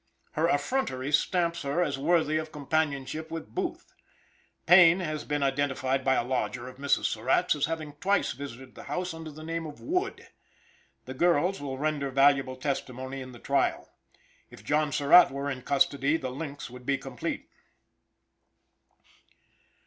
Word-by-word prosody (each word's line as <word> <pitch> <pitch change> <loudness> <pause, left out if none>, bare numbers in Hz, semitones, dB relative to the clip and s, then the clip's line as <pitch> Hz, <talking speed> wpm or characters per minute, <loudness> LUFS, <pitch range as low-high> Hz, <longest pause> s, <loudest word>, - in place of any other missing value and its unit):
Her 160 +2 +1
effrontery 145 - -1
stamps 170 +2 +1
her 145 +5 0
as 140 -4 -2
worthy 155 0 +2
of 155 0 -4
companionship 150 0 -2
with 165 0 -7
Booth. 350 -2 -4 0.7
Payne 175 0 +7
has 155 -4 -3
been 145 -1 -1
identified 135 -1 0
by 130 0 +3
a - - +1
lodger 125 -1 -2
of 130 - -11
Mrs. 140 0 +1
Surratt's, 130 +11 +2
as 145 -1 0
having 155 -2 -4
twice 195 +7 +1
visited 130 -1 -9
the 180 - -11
house 180 0 -3
under 165 -1 -8
the 155 +1 -11
name 165 0 -3
of 150 - -10
Wood. 365 +4 -2 0.8
The 130 - -6
girls 175 +5 +2
will 135 -2 -4
render 145 -1 -1
valuable 135 -1 +3
testimony 130 -1 -4
in 130 0 -8
the 120 - -12
trial. 140 +3 -1 0.6
If 100 - -14
John 150 +4 +1
Surratt 150 +6 +7
were 140 +1 -3
in 130 -2 -5
custody 140 +2 +2
the 130 - -5
links 140 +1 -6
would 125 +1 -12
be 140 -1 +2
complete. 135 -3 -5
145 Hz, 155 wpm, -28 LUFS, 135-165 Hz, 0.8 s, Payne